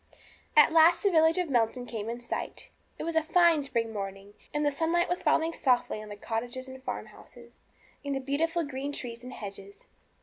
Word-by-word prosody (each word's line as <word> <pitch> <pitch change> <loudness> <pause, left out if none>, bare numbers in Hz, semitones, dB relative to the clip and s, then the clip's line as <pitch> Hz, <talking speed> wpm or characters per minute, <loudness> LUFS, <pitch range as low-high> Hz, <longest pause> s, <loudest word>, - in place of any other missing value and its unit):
At 300 - +8
last 330 +1 +6
the 400 - +3
village 320 0 +4
of 360 -2 0
Melton 245 -2 +1
came 225 -2 -5
in 235 +1 -4
sight. 240 - -5 0.3
It - - -5
was 335 0 -3
a 320 - +4
fine 330 0 +4
spring 235 -5 -2
morning, 195 0 -6 0.2
and 295 0 0
the 290 - +3
sunlight 330 +4 +1
was 355 - -2
falling 325 +1 +2
softly 245 -6 +1
on 215 - -10
the 205 - -7
cottages, 240 +5 -4
and 260 0 -10
farmhouses, - - -8 0.5
and 280 -1 -2
the - - -1
beautiful 320 +5 0
green 285 0 -4
trees 240 -3 -6
and 250 - -8
hedges. 200 -2 -9
270 Hz, 195 wpm, -29 LUFS, 230-320 Hz, 0.5 s, At